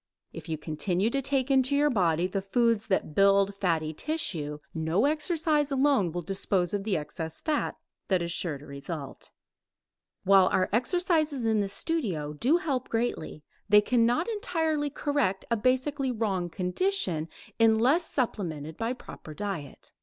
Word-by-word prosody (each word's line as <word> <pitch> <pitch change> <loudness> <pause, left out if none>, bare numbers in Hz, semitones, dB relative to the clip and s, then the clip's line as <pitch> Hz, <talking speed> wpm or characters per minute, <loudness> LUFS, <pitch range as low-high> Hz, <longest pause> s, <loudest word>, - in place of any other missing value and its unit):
If - - -9
you 160 - -2
continue 175 +7 -1
to 275 - 0
take 270 0 0
into 265 +1 +3
your 295 +1 +3
body 175 -6 +2
the 195 +1 -2
foods 230 +2 +1
that 190 -6 0
build 200 +2 +4
fatty 165 -5 -1
tissue, 160 - -3 0.2
no 160 +8 +1
exercise 300 -1 +1
alone 270 - +2
will 175 +1 -4
dispose 190 -1 0
of 200 -1 -1
the 205 -4 0
excess 160 +1 -5
fat 305 -2 -1 0.3
that 185 -3 +1
is 170 - -3
sure 170 -4 -2
to 140 - -14
result. 140 0 -7 0.9
While 190 -1 +6
our 185 0 +1
exercises 310 - +1
in 220 -1 +2
the 200 -1 -1
studio 195 - -2
do 255 - +2
help 275 -7 -2
greatly, 225 -10 -2 0.3
they 210 0 +7
cannot 240 +7 +2
entirely 320 -9 -1
correct 285 -9 -1
a - - +4
basically 260 +4 0
wrong 200 -7 -1
condition 180 - -1 0.3
unless 235 +9 +4
supplemented 160 - -3
by 230 +2 -1
proper 155 -10 -11
diet. 195 -8 -6
210 Hz, 150 wpm, -28 LUFS, 175-275 Hz, 0.9 s, they